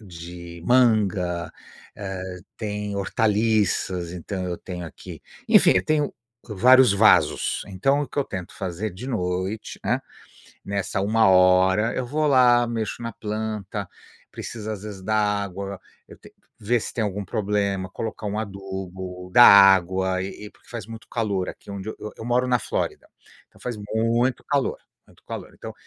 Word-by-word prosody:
de 85 -2 -10
manga, 100 -8 +2 0.5
eh, 95 -2 -6 0.2
tem 105 -1 -4
hortaliças, 100 -4 +1
então 90 +2 -5
eu 90 -1 -4
tenho 90 -1 -7
aqui - - -11 0.3
enfim, - - +6
eu 90 - +1
tenho 150 -2 +1 0.4
vários 125 +2 +6
vasos. 110 +2 +3
Então 135 +10 +1
o 145 - -5
que - - -6
eu 140 - +2
tento 90 -3 -7
fazer, 95 +3 -4
de 115 +8 -8
noite, 95 -2 -3
hã, - - +1 0.7
nessa 100 -1 -2
1 110 +2 +3
hora, 95 +4 +4
eu 130 - -2
vou 150 +4 0
lá, 125 -3 +5
mexo 115 -1 -3
na 115 - -3
planta. 105 -2 -4 0.4
Precisa 110 -2 -6
às 100 -1 -9
vezes 105 -3 -8
dar 110 +2 +1 0.3
água, 100 +1 -6 0.3
eu - - -14
t - - -17 0.3
ver 120 +3 +1
se - - -6
tem 115 - -1
algum 100 -1 -3
problema, 100 -2 -1
colocar 110 +2 -5
um 105 +1 -3
adubo, 95 -3 -7
dar 120 - +9
água 95 -1 +6
e 100 +2 -7
e 105 - -9
porque - - -25
faz 115 -5 -6
muito 115 0 -10
calor 100 -5 -1
aqui - - -12
onde 100 +1 -6
eu - - -6
eu 105 - -7
eu - - -8
moro 125 +1 +1
na 125 -1 +2
Flórida, - - -3 0.4
então - - -23
faz 125 -1 -4 0.2
muito 115 +3 +1
calor, 140 -2 0 0.3
muito - - -22
calor. - - -7
Então, - - -9
100 Hz, 160 wpm, -24 LUFS, 95-115 Hz, 0.7 s, dar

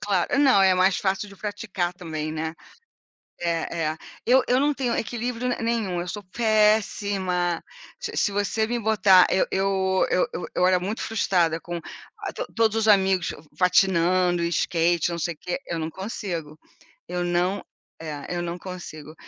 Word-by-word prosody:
claro. 200 +4 0
Não, 265 -8 +5
é 190 -1 +6
mais 185 +1 +3
fácil 195 +1 -1
de 200 - -14
praticar 200 -4 -3
também, 155 -4 -5
né. 160 +1 -3 0.9
É, 170 0 -1
é. 160 - -8 0.3
Eu 255 +1 +5
eu 250 +1 +3
não 295 +1 +2
tenho 255 -4 -1
equilíbrio 240 +2 -3
ne 250 - +1
nenhum. 225 -6 -1
Eu 175 - -4
sou 205 +3 -5
péssima, 205 -5 +1 0.4
se - - -5
se 205 - +1
você 205 +2 0
me 240 0 -1
botar 200 -4 +5
eu - - +3
eu 190 -1 +1
eu 180 - +2
eu - - -4
eu 180 - +3
era 185 -1 +4
muito 200 +5 -4
frustrada 175 -7 +1
com 175 0 -5 0.4
a - - -4
to - - -4
todos 225 -1 +2
os 220 0 +1
amigos 190 -3 +3
f - - -12 0.2
patinando, 180 -1 +3
skate, 170 0 +1
não 170 - -3
sei 170 +1 -1
o - - -25
quê, 180 - -3
eu 170 - -3
não 160 0 -3
consigo, 170 -4 -5 0.5
eu 180 0 -3
não 180 +3 0 0.4
é, 150 -3 -6
eu 175 - -1
não 175 0 -4
consigo. 160 -5 -9
185 Hz, 175 wpm, -24 LUFS, 175-210 Hz, 0.9 s, é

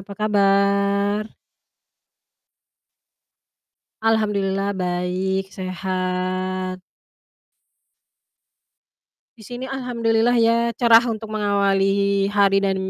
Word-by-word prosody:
apa 200 +1 -11
kabar? 200 0 +2 2.8
Alhamdulillah 200 -3 0
baik, 185 +2 -2
sehat. 185 0 -3 2.6
Di - - -14
sini 245 +1 -7
alhamdulillah 240 -3 0
ya 230 0 +3 0.2
cerah 230 0 +5
untuk 220 -2 -5
mengawali 200 -1 +1
hari 200 -1 +4
dan 195 -1 0
200 Hz, 65 wpm, -21 LUFS, 190-220 Hz, 2.8 s, cerah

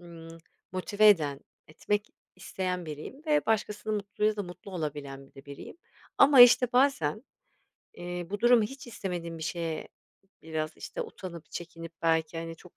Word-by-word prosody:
ımm, 165 -1 -12 0.3
motive 205 +3 +3
eden, 150 -8 +3 0.3
etmek 205 +6 -2 0.3
isteyen 185 -1 -3
biriyim 155 - -8
ve 300 -1 +2
başkasının 215 0 0
mutluluğuyla 210 +1 -1
da 205 - -2
mutlu 180 +2 -10
olabilen 145 -5 -5
bir - - -26
de 135 - -13
biriyim. 140 - -10 0.4
Ama 275 -2 +8
işte 245 0 +8
bazen, 245 - +2 0.7
eee, 175 0 -5
bu 205 0 -3
durumu 240 -1 +6
hiç 270 +6 -6
istemediğim 175 -7 -5
bir - - -7
şeye, 165 0 -3 0.5
biraz, 155 0 -4
işte, - - -5
utanıp 180 - -9
çekinip 165 -1 -8
belki, 165 0 +1
hani, 165 0 -6
çok 180 - -18
175 Hz, 150 wpm, -29 LUFS, 160-210 Hz, 0.7 s, Ama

